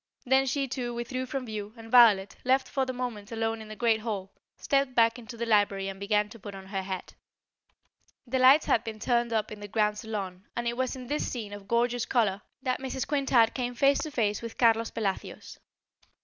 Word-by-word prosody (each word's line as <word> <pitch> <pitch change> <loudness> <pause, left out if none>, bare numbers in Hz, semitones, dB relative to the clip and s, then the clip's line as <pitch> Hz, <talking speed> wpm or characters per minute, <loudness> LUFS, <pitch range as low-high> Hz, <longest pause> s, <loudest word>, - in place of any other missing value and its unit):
Then 265 +1 +3
she 275 +1 0
too 245 -2 -4
withdrew 255 +2 -3
from 270 -2 -4
view 215 -2 -6
and 225 0 -11
Violet, 215 -6 +6
left 260 +1 +2
for 265 -1 -1
the - - -1
moment 245 -5 -5
alone 225 0 -2
in 220 - -10
the 215 - -8
great 225 +1 +2
hall, 205 -4 -4 0.3
stepped 275 -2 0
back 230 +1 +4
into 235 0 -10
the 235 - -2
library 205 -3 +2
and 195 0 -8
began 210 +1 +1
to 230 - -12
put 200 0 -8
on 190 0 -9
her 195 0 -3
hat. 190 -1 -6 1.1
The 260 +1 -1
lights 265 +4 +7
had 230 - +2
been 225 -2 -6
turned 235 +1 +1
up 220 -2 -1
in 210 - -8
the 205 - -7
grand 210 0 +1
salon 195 -4 -5
and 235 0 -2
it 235 - -1
was 255 +1 -1
in 255 -1 -8
this 295 +4 -2
scene 215 -5 -5
of 205 -1 -10
gorgeous 240 +1 +1
colour 210 -5 +1 0.2
that 255 -1 0
Mrs. 265 -1 -4
Quintard 270 -6 +3
came 245 -1 -3
face 275 +3 +4
to 310 - -3
face 215 -8 0
with 230 -1 -7
Carlos 230 -1 +3
Pelacios. 200 -4 -4
230 Hz, 215 wpm, -28 LUFS, 210-255 Hz, 1.1 s, lights